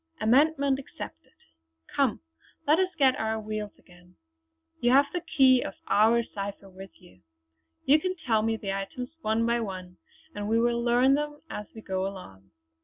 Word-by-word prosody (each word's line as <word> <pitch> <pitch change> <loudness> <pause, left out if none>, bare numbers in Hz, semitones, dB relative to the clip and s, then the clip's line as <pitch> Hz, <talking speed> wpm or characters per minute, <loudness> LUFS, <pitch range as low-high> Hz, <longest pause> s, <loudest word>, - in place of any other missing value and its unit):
Amendment 275 +4 +3
accepted! 270 - -10 0.6
Come, - - +1 0.4
let 305 +4 +4
us 375 -1 +2
get 275 -4 +6
on - - -1
our 220 0 -1
wheels 215 -1 -5
again. 180 0 -21 0.6
You 240 - +2
have 280 +2 +6
the 355 - -2
key 265 -6 +4
of - - -5
our 225 +3 +4
cipher 200 -2 -7
with 190 +1 -13
you; 90 0 -20 0.6
you 290 +3 +5
can 370 +3 -2
tell 220 -4 +3
me 225 0 0
the 195 -3 -4
items 195 +6 -5
one 220 -1 +1
by 235 0 +1
one, 185 -4 -6 0.4
and 205 0 -4
we 225 +1 +3
will 235 0 +1
learn 245 +3 +4
them 295 +1 -2
as 210 -1 -6
we 220 - -9
go 190 -1 -2
along." 95 - -10
225 Hz, 175 wpm, -27 LUFS, 195-265 Hz, 0.6 s, get